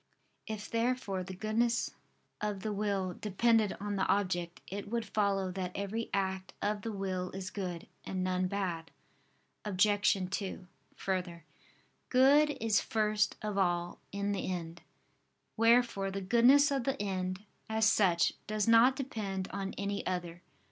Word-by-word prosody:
If 215 -1 -5
therefore 230 -5 -1
the 190 +1 -7
goodness 225 +4 0 0.5
of 210 -2 -2
the 215 +1 -2
will 200 -3 -1
depended 215 +2 +2
on 205 0 -3
the 190 - +1
object, 175 -3 0
it 200 +1 -6
would 230 0 -1
follow 195 -2 0
that 180 -1 -3
every 205 +3 -3
act 190 -1 -2
of 205 0 -1
the 225 - -4
will 190 -2 -3
is 190 0 -5
good, 180 -4 -4 0.2
and 185 -1 -3
none 185 0 0
bad. 180 -4 -3 0.7
Obj. 205 0 +3
2: 195 -2 -4 0.3
Further, 180 -4 -3 0.6
good 285 +4 +5
is 220 -1 +2
first 215 -1 +1
of 210 -2 -1
all 175 -2 0
in 200 +1 -1
the 195 -2 -2
end: 170 -2 -5 0.7
wherefore 230 -3 +3
the 195 +1 -3
goodness 245 +9 +5
of 270 -3 0
the 270 +2 -1
end, 185 -1 -2 0.3
as 220 0 +3
such, 180 -5 +3
does 215 -1 0
not 230 +3 +6
depend 205 -9 -4
on 195 0 -4
any 200 0 -2
other. 175 -2 -3
200 Hz, 145 wpm, -32 LUFS, 185-220 Hz, 0.7 s, not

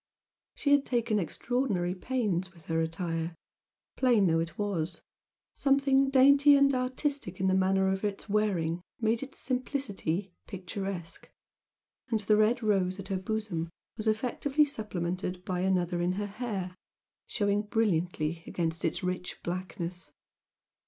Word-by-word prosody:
She 285 - 0
had 285 -1 +6
taken 235 -5 +1
extraordinary 195 - -1
pains 190 -4 -1
with 165 - -18
her 165 0 0
attire, 165 0 -2 0.6
plain 240 -6 +4
though 165 -2 +3
it 165 +1 -3
was 185 -5 -2 0.5
something 275 -1 +3
dainty 280 +2 +7
and 280 0 +5
artistic 255 - -2
in 190 - 0
the 190 - +3
manner 190 0 +3
of 190 +1 0
its 205 0 -3
wearing 185 -6 +1 0.2
made 225 0 +1
its 275 0 -8
simplicity 205 - -2
picturesque, 190 -2 -5 0.8
and 225 - +1
the 210 +1 +3
red 215 +3 +3
rose 195 -3 +1
at 195 - -7
her 195 - 0
bosom 190 -5 -2 0.3
was 220 -1 -4
effectively 265 +6 +2
supplemented 185 -7 -3
by 180 -1 -1
another 180 -2 +1
in 175 +1 +1
her 205 +2 -2
hair, 200 -4 -4 0.5
showing 205 -1 +1
brilliantly 175 -7 0
against 165 -1 -2
its 175 +3 -1
rich 180 0 -3
blackness. 175 -2 -4
195 Hz, 135 wpm, -30 LUFS, 180-235 Hz, 0.8 s, dainty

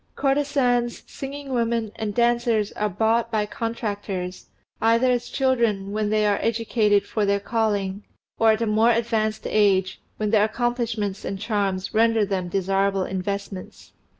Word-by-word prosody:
Courtesans, 270 -4 +1
singing 275 0 -7
women, 230 -2 0
and 215 -2 -4
dancers 235 -3 +2
are 210 0 -1
bought 225 +4 +1
by 215 -2 0
contractors, 205 -5 -4 0.3
either 230 +3 +4
as 245 -1 -1
children, 235 -7 +1
when 210 0 -1
they 215 0 +2
are 205 -1 +2
educated 225 -3 +1
for 215 - -1
their 200 0 +2
calling, 205 -3 -1 0.4
or 225 - +5
at 220 +1 +3
a - - +1
more 220 +2 +3
advanced 225 -2 0
age, 195 -3 +2 0.2
when 210 -1 -1
their 210 -2 +5
accomplishments 225 -3 -2
and 195 - -4
charms 200 -3 -1
render 225 -1 +3
them 190 -3 -2
desirable 195 +1 +1
investments. 190 0 -5
215 Hz, 145 wpm, -24 LUFS, 200-235 Hz, 0.4 s, or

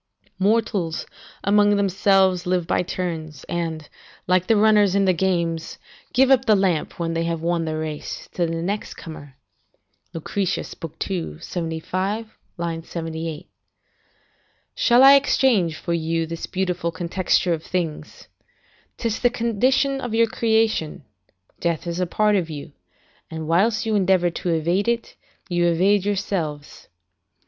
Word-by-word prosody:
["Mortals, 200 -5 0 0.4
amongst 205 +1 +4
themselves, 195 -2 +2
live 180 -1 +1
by - - +1
turns, 165 -5 -4
and, 160 -3 -4 0.4
like 185 0 +2
the 225 - +4
runners 210 -2 +4
in 200 0 +3
the 185 - +4
games, 170 -2 -1 0.3
give 265 +2 +4
up 260 -1 +4
the 215 - +5
lamp, 185 -5 0
when 165 -1 -1
they 165 0 0
have 165 -1 -3
won 170 -1 0
the 155 0 -2
race, 155 -1 -5
to 175 -2 0
the 165 0 -3
next 205 +4 -3
comer. 145 -5 -10 0.4
" - - -45
Lucretius, 185 +3 -2 0.3
ii. 180 -5 -4
75, 185 +6 -3 0.2
78.] 165 -1 -5 1.3
"Shall 245 +1 +4
I 275 +1 +10
exchange 250 - +3
for 170 - -3
you 165 0 0
this 165 +1 -6
beautiful 180 -3 -2
contexture 175 +1 0
of 160 - -3
things? 160 -4 -4 0.7
'Tis 230 -2 -2
the 245 - +3
condition 255 +4 +1
of 245 -3 -3
your 230 0 +5
creation; 220 -9 0 0.6
death 170 -2 -1
is 170 0 -3
a 180 - 0
part 210 +3 +2
of 175 -4 0
you, 150 0 -7 0.6
and 160 -1 -6
whilst 210 +7 +2
you 220 - 0
endeavour 185 -3 +3
to 175 - -4
evade 170 +5 +1
it, 235 0 -1 0.3
you 175 -2 +1
evade 190 +4 +3
yourselves. 170 -7 -3
180 Hz, 140 wpm, -22 LUFS, 165-205 Hz, 1.3 s, I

